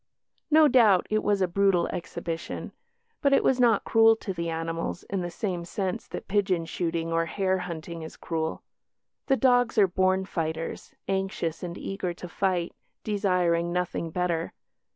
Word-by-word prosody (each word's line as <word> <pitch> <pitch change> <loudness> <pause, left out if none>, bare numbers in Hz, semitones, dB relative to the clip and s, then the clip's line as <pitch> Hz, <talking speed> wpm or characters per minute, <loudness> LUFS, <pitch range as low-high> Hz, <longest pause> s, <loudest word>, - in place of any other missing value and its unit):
No 310 0 +7
doubt 225 -9 +5
it 215 0 +2
was 205 -2 +1
a - - +2
brutal 190 -1 +2
exhibition. 165 -1 -5 0.5
But 280 -1 +3
it - - +4
was 260 - +3
not 235 -4 +4
cruel 225 0 +5
to 210 -3 -5
the 170 -1 -3
animals 165 +1 -3
in 195 -1 -3
the 175 - -3
same 175 0 -3
sense 185 +1 -3
that - - -7
pigeon 190 -4 +1
shooting 165 -1 -2
or 165 0 +1
hare 190 +1 0
hunting 170 -1 -6
is 160 - -9
cruel. 160 -1 -3 0.6
The 270 - +3
dogs 245 -3 +3
are 205 - +7
born 185 +1 +1
fighters, 165 -2 -4
anxious 190 -4 -2
and 175 -1 -5
eager 180 -3 -4
to 180 - -8
fight, 175 0 -1 0.3
desiring 180 -5 +1
nothing 180 -1 -2
better. 170 -1 -1
180 Hz, 160 wpm, -27 LUFS, 170-200 Hz, 0.6 s, No